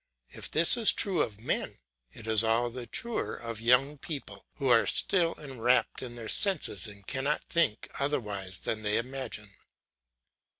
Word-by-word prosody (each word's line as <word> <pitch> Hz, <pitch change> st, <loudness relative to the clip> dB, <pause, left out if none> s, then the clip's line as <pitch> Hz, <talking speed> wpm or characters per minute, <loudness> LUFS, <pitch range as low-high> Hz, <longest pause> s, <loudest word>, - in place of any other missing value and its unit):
If -, -, -6 dB
this 165 Hz, +9 st, +5 dB
is 230 Hz, -3 st, +7 dB
true 195 Hz, -5 st, 0 dB
of 105 Hz, -2 st, -3 dB
men, 120 Hz, -, -3 dB, 0.3 s
it 115 Hz, -, -12 dB
is 110 Hz, 0 st, +5 dB
all 115 Hz, +2 st, +1 dB
the 120 Hz, 0 st, -7 dB
truer 235 Hz, -, -3 dB
of 115 Hz, -2 st, -7 dB
young 135 Hz, +5 st, +3 dB
people 135 Hz, -12 st, -7 dB
who 140 Hz, -, -3 dB
are 120 Hz, -2 st, +4 dB
still 170 Hz, -3 st, +2 dB
enwrapped 130 Hz, -4 st, 0 dB
in 120 Hz, -2 st, -7 dB
their 115 Hz, -2 st, -7 dB
senses 165 Hz, -, +1 dB
and 100 Hz, -1 st, -12 dB
cannot 135 Hz, +6 st, -1 dB
think 165 Hz, -11 st, +1 dB
otherwise 105 Hz, -10 st, -3 dB
than 110 Hz, +2 st, -4 dB
they 105 Hz, 0 st, +1 dB
imagine. 120 Hz, -4 st, -5 dB
120 Hz, 160 wpm, -29 LUFS, 110-145 Hz, 0.3 s, is